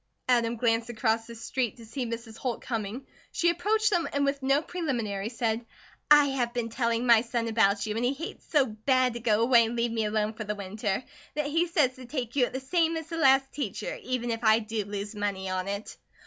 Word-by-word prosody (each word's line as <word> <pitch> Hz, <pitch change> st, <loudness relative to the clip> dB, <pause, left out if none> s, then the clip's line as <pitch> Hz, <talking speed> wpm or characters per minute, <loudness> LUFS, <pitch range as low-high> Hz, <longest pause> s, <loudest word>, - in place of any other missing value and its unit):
Adam 235 Hz, -2 st, +2 dB
glanced 230 Hz, 0 st, +1 dB
across 225 Hz, -1 st, 0 dB
the 235 Hz, -, -9 dB
street 240 Hz, +1 st, -2 dB
to 230 Hz, -, -12 dB
see 240 Hz, +3 st, -4 dB
Mrs. 230 Hz, -1 st, -6 dB
Holt 245 Hz, -1 st, -3 dB
coming. 225 Hz, +2 st, -4 dB, 0.3 s
She 345 Hz, 0 st, +2 dB
approached 425 Hz, +5 st, +1 dB
them 345 Hz, -4 st, +1 dB
and 285 Hz, 0 st, +1 dB
with 280 Hz, 0 st, -1 dB
no 275 Hz, +3 st, +2 dB
preliminaries 235 Hz, -, -3 dB
said: 225 Hz, 0 st, 0 dB, 0.5 s
"I 295 Hz, -1 st, +7 dB
have 245 Hz, -3 st, -1 dB
been 235 Hz, -2 st, -1 dB
telling 235 Hz, 0 st, 0 dB
my 235 Hz, -2 st, +7 dB
son 235 Hz, 0 st, -2 dB
about 205 Hz, -3 st, +2 dB
you 215 Hz, -1 st, -3 dB
an' 225 Hz, -, -1 dB
he 245 Hz, +1 st, +2 dB
hates 315 Hz, +5 st, -8 dB
so 290 Hz, -4 st, +4 dB
bad 250 Hz, +3 st, +1 dB
to 235 Hz, -, -5 dB
go 225 Hz, -1 st, +2 dB
away 235 Hz, -1 st, +6 dB
and 230 Hz, +1 st, -2 dB
leave 235 Hz, 0 st, 0 dB
me 225 Hz, -1 st, 0 dB
alone 215 Hz, 0 st, 0 dB
for 220 Hz, -, -6 dB
the 210 Hz, 0 st, -3 dB
winter, 205 Hz, +2 st, -3 dB, 0.3 s
that 300 Hz, -1 st, 0 dB
he 330 Hz, +4 st, +1 dB
says 300 Hz, -7 st, +2 dB
to 255 Hz, -1 st, -10 dB
take 245 Hz, -3 st, -4 dB
you 260 Hz, -3 st, +4 dB
at -, -, -8 dB
the 260 Hz, -, -2 dB
same 325 Hz, +4 st, +1 dB
as 320 Hz, -1 st, -7 dB
the 330 Hz, -, -4 dB
last 270 Hz, -3 st, +4 dB
teacher, 260 Hz, -10 st, -4 dB
even 245 Hz, -2 st, -2 dB
if 225 Hz, +1 st, -3 dB
I 220 Hz, 0 st, +6 dB
do 220 Hz, -2 st, -3 dB
lose 205 Hz, +1 st, -5 dB
money 200 Hz, -2 st, -2 dB
on 185 Hz, 0 st, -2 dB
it." 200 Hz, +1 st, -4 dB
235 Hz, 230 wpm, -28 LUFS, 220-270 Hz, 0.5 s, I